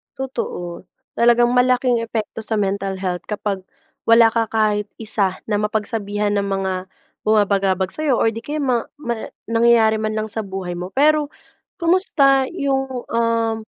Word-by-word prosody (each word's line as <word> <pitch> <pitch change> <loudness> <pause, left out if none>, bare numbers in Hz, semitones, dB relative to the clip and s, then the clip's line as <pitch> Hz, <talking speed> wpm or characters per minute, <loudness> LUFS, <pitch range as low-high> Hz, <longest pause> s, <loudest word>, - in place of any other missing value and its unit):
Totoo. 185 -10 -5 0.3
Talagang 240 0 +4
malaking 250 -1 +3
epekto 225 -1 -4
sa 220 - 0
mental 195 -1 -2
health 180 -2 -3
kapag 200 -2 -3 0.4
wala 230 0 +6
ka 225 -1 0
kahit 210 -1 +1
isa 200 -4 +1
na 210 - +2
mapagsabihan 210 -1 -1
ng 200 - 0
mga 195 -1 -1 0.5
bumabagabag 195 -3 +2
sa'yo 305 -4 +1
or 225 - +2
'di 225 - -6
kaya 295 +5 -4
ma 245 -4 0
ma 240 -6 -4 0.2
nangyayari 230 -1 +4
man 215 0 -2
lang 215 0 -2
sa 225 - -3
buhay 190 -2 -5
mo. 180 +2 -6
Pero, 300 +1 +3 0.5
kumusta 280 -7 +3
yung, 270 -5 -2
um, 230 -1 +1
225 Hz, 145 wpm, -20 LUFS, 200-245 Hz, 0.5 s, wala